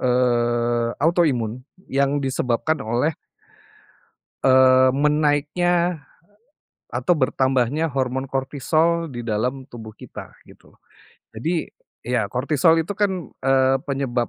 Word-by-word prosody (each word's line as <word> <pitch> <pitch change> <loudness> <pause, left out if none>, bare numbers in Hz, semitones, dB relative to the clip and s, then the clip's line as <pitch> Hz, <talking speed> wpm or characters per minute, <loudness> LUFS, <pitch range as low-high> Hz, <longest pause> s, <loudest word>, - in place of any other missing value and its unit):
eee, 120 -1 +1
auto-imun 135 -8 +1 0.2
yang 140 +1 0
disebabkan 130 +3 -1
oleh 120 +7 0 1.3
eee, 130 -1 +5
menaiknya, 150 +4 +1 0.9
atau 180 - +1
bertambahnya 130 +1 +1
hormon 130 0 -2
kortisol 155 +5 0
di 120 - -6
dalam 120 +4 -2
tubuh 110 -2 -10
kita - - -11
gitu. - - -19 0.6
Jadi, 160 +10 -2 0.4
ya 120 -3 0
kortisol 150 - +2
itu 205 - -4
kan, 190 - -2
eee, 135 0 +3
penyebab 130 -4 -1
135 Hz, 95 wpm, -22 LUFS, 125-155 Hz, 1.3 s, eee